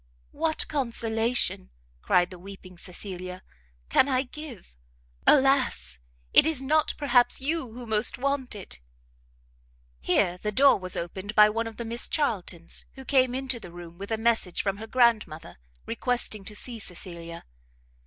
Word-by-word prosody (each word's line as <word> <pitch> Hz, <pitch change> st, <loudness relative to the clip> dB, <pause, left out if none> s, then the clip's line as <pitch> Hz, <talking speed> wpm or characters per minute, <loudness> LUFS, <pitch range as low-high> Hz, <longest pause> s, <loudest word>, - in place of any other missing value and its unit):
"What 315 Hz, +1 st, -1 dB
consolation," 230 Hz, -, -1 dB, 0.3 s
cried 180 Hz, 0 st, +2 dB
the 180 Hz, -, -10 dB
weeping 190 Hz, -1 st, -11 dB
Cecilia, 180 Hz, 0 st, -7 dB, 0.4 s
"can 260 Hz, -, +4 dB
I 260 Hz, -1 st, +2 dB
give? 260 Hz, -, -11 dB, 0.5 s
Alas! 260 Hz, -, +3 dB, 0.3 s
it -, -, +8 dB
is 320 Hz, -4 st, +1 dB
not, 305 Hz, +3 st, +1 dB
perhaps, 245 Hz, -4 st, +3 dB
you 275 Hz, -2 st, -2 dB
who 245 Hz, +1 st, -8 dB
most 220 Hz, 0 st, +4 dB
want 270 Hz, -2 st, -1 dB
it! 190 Hz, -, -9 dB, 0.6 s
" -, -, -36 dB
Here 180 Hz, -, +1 dB
the 210 Hz, -, -1 dB
door 275 Hz, +3 st, +5 dB
was 185 Hz, -1 st, -3 dB
opened 190 Hz, +5 st, -5 dB
by 210 Hz, 0 st, +7 dB
one 230 Hz, +1 st, -2 dB
of 225 Hz, -, -9 dB
the 235 Hz, -, -5 dB
Miss 235 Hz, +1 st, 0 dB
Charltons, 190 Hz, -, -2 dB
who 265 Hz, -1 st, -10 dB
came 255 Hz, -2 st, +3 dB
into 265 Hz, -2 st, -2 dB
the 180 Hz, -, -11 dB
room 170 Hz, 0 st, -11 dB
with 200 Hz, -, -7 dB
a 225 Hz, -, 0 dB
message 225 Hz, -5 st, +1 dB
from 195 Hz, -1 st, -1 dB
her 220 Hz, +2 st, -8 dB
grandmother, 220 Hz, -, +1 dB, 0.3 s
requesting 220 Hz, -, -1 dB
to 210 Hz, -, -7 dB
see 235 Hz, +2 st, -5 dB
Cecilia. 170 Hz, -3 st, -8 dB
220 Hz, 155 wpm, -27 LUFS, 180-255 Hz, 0.6 s, it